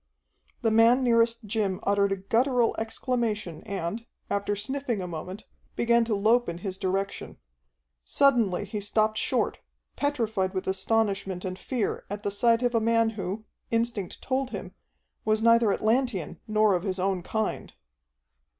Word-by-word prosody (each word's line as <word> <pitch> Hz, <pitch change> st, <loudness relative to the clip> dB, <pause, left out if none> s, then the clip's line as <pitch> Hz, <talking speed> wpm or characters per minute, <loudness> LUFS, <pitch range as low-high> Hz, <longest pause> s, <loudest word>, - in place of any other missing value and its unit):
The 225 Hz, -, +3 dB
man 230 Hz, +4 st, +5 dB
nearest 230 Hz, -1 st, +3 dB
Jim 205 Hz, -3 st, -1 dB
uttered 200 Hz, 0 st, +2 dB
a -, -, +2 dB
guttural 235 Hz, +5 st, +1 dB
exclamation 220 Hz, -, -2 dB
and, 200 Hz, +4 st, -4 dB, 0.2 s
after 200 Hz, 0 st, 0 dB
sniffing 245 Hz, +2 st, -2 dB
a 180 Hz, -, -4 dB
moment, 180 Hz, +4 st, -7 dB, 0.3 s
began 235 Hz, 0 st, +3 dB
to 225 Hz, -2 st, 0 dB
lope 225 Hz, +3 st, +3 dB
in 170 Hz, -, -4 dB
his 190 Hz, -1 st, -4 dB
direction. 195 Hz, +1 st, -2 dB, 0.7 s
Suddenly 235 Hz, -, +2 dB
he 210 Hz, -, -4 dB
stopped 215 Hz, +1 st, +1 dB
short, -, -, 0 dB, 0.4 s
petrified 220 Hz, -10 st, -1 dB
with 185 Hz, -, -2 dB
astonishment 195 Hz, -1 st, 0 dB
and 185 Hz, 0 st, -4 dB
fear 245 Hz, -5 st, -2 dB
at 205 Hz, +1 st, -5 dB
the 200 Hz, -, -1 dB
sight 230 Hz, +3 st, +3 dB
of 245 Hz, 0 st, +1 dB
a 230 Hz, -, +3 dB
man 230 Hz, 0 st, +2 dB
who, 205 Hz, +1 st, -5 dB, 0.2 s
instinct 230 Hz, -5 st, -2 dB
told 265 Hz, 0 st, -1 dB
him, -, -, -7 dB, 0.5 s
was 215 Hz, 0 st, +1 dB
neither 230 Hz, -2 st, +5 dB
Atlantean 220 Hz, -, 0 dB
nor 215 Hz, -1 st, +3 dB
of 180 Hz, -, +1 dB
his 190 Hz, 0 st, -2 dB
own 190 Hz, 0 st, 0 dB
kind. 220 Hz, +4 st, -3 dB
215 Hz, 150 wpm, -27 LUFS, 195-230 Hz, 0.7 s, man